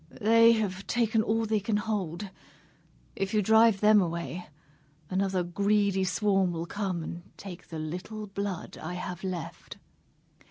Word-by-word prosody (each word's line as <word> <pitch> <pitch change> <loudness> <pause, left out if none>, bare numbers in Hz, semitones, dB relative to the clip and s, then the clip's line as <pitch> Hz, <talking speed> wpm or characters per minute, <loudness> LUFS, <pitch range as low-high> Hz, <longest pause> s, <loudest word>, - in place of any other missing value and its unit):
They 230 +2 +6
have 200 -3 -2
taken 225 -2 +2
all 225 +1 +1
they 215 -1 +1
can 205 +1 0
hold. 205 -3 -3 0.8
If 195 +2 -2
you 210 - +3
drive 220 0 +5
them 210 -1 +6
away, 170 0 -3 0.6
another 190 -1 +1
greedy 200 +1 +1
swarm 190 0 +1
will 165 0 -3
come 185 -3 -3
and 170 +2 -6 0.2
take 180 -3 -9
the 165 - -7
little 180 +7 -5
blood 200 -2 -5
I 175 +3 -5
have 180 0 -5
left." 180 -4 -6
195 Hz, 145 wpm, -28 LUFS, 180-215 Hz, 0.8 s, They